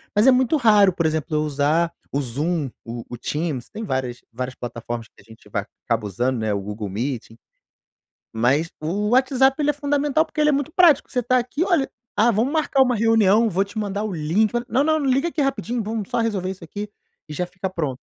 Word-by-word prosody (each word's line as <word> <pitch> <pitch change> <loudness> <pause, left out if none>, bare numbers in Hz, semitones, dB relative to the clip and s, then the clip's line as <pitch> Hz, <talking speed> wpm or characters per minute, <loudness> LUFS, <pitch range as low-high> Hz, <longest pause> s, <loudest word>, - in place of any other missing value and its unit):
mas 210 +4 +4
é - - +9
muito 255 +3 +3
raro, 210 -7 +5
por 170 -2 -1
exemplo, 155 -1 -1
eu 150 - +2
usar 150 +3 +1 0.2
o 140 - +1
Zoom, 145 +4 -2 0.2
o 115 0 -6
o 120 - -6
Teams, 150 -1 -3
tem 220 +1 -7
várias 130 - -3
várias 125 +2 -5
plataformas 120 -1 -6
que - - -27
a - - -21
gente 110 -2 -17
vai 100 0 -2 0.2
acaba 115 -3 0
usando, 120 +6 -1
né, 110 -1 0
o 100 - -2
Google 105 +1 -5
Meeting. 115 +1 -4 1.0
Mas 135 +9 +2
o 200 +7 -1
WhatsApp 265 +1 +4
ele 295 0 +2
é - - -11
fundamental, 290 +1 +1
porque 310 - -8
ele 300 - +4
é - - +4
muito 285 +2 -1
prático, 330 -6 +5
você 250 -2 -1
tá 255 +2 +3
aqui: 255 +7 -2
"Olha, 340 -8 +1 0.3
ah, 225 +3 +4
vamos 230 +7 +1
marcar 290 -4 +3
uma 250 -2 +1
reunião, 225 0 +4
vou 190 +2 +1
te 210 +3 -12
mandar 205 0 -2
o 215 - -3
link, 175 +9 +1
olha, 240 0 -1
não, 270 +4 +2
não 315 0 +2
não 280 - -1
liga 275 +7 +2
aqui 310 - -2
rapidinho, 245 -3 -1
vamos 215 -1 -4
só - - 0
resolver 200 -5 -1
isso 185 -2 -10
aqui 205 +6 -6 0.4
e - - -6
já 180 +4 -1
fica 185 +1 -5
pronto", 150 -8 -3
195 Hz, 225 wpm, -22 LUFS, -, 1.0 s, é